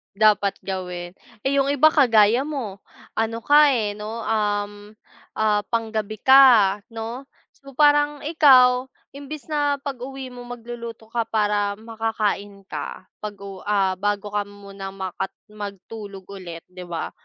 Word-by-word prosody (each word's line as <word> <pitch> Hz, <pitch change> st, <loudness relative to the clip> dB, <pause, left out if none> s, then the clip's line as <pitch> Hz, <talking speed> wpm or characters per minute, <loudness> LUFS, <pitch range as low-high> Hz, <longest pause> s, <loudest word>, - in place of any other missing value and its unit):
Dapat 205 Hz, -1 st, +3 dB
gawin. 180 Hz, -2 st, -5 dB, 0.3 s
Eh 270 Hz, +1 st, +1 dB
yung 275 Hz, 0 st, +2 dB
iba 285 Hz, +2 st, +5 dB
kagaya 240 Hz, -5 st, +5 dB
mo 250 Hz, -10 st, -5 dB, 0.3 s
ano 225 Hz, +1 st, -1 dB
ka 295 Hz, +3 st, +6 dB
eh 215 Hz, -5 st, 0 dB
no? 215 Hz, +2 st, -6 dB
Uhm 205 Hz, -1 st, -1 dB, 0.5 s
ah, 210 Hz, -1 st, +2 dB
pang-gabi 220 Hz, -2 st, -2 dB
ka, 240 Hz, -7 st, +7 dB
no? 230 Hz, +4 st, -6 dB, 0.3 s
So 275 Hz, 0 st, -14 dB
parang 290 Hz, +1 st, +3 dB
ikaw 260 Hz, -5 st, +5 dB, 0.2 s
imbes 285 Hz, +1 st, -8 dB
na 290 Hz, -1 st, +2 dB
pag-uwi 270 Hz, -1 st, -6 dB
mo 245 Hz, 0 st, -9 dB
magluluto 235 Hz, -2 st, -8 dB
ka 235 Hz, -1 st, 0 dB
para 205 Hz, -2 st, +1 dB
makakain 215 Hz, -3 st, -3 dB
ka, 185 Hz, -, -6 dB, 0.2 s
pag-u 200 Hz, -2 st, -7 dB
ah, 195 Hz, -2 st, +1 dB
bago 205 Hz, +1 st, -2 dB
ka 205 Hz, -, +1 dB
muna 200 Hz, -1 st, -9 dB
maka 190 Hz, 0 st, -4 dB, 0.2 s
matulog 205 Hz, -1 st, -8 dB
ulit 180 Hz, -4 st, -9 dB
di 180 Hz, 0 st, -10 dB
ba. 170 Hz, -2 st, -5 dB
215 Hz, 130 wpm, -23 LUFS, 200-255 Hz, 0.5 s, ka